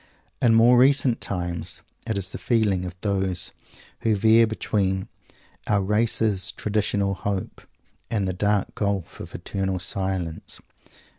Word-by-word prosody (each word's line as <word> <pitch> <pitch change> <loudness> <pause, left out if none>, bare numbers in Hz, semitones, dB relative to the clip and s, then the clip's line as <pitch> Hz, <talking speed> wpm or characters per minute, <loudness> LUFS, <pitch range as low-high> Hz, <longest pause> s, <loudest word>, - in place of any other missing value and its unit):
In 115 -2 +5
more 120 +2 +6
recent 135 -2 +4
times, 90 -3 -4 0.2
it 110 - -1
is 95 -1 -2
the - - -6
feeling 105 -6 +1
of 90 0 -6
those 95 -3 -1 0.5
who 110 -2 +1
veer 110 +2 +5
between 95 -3 -1 0.6
our 100 -2 +2
race's 105 -1 +2
traditional 100 -2 0
hope 100 0 -4 0.5
and 105 -4 0
the 95 - -1
dark 100 +2 0
gulf 100 -4 -2
of - - -8
eternal 95 -1 -2
silence. 95 -3 -3
100 Hz, 130 wpm, -24 LUFS, 95-110 Hz, 0.6 s, more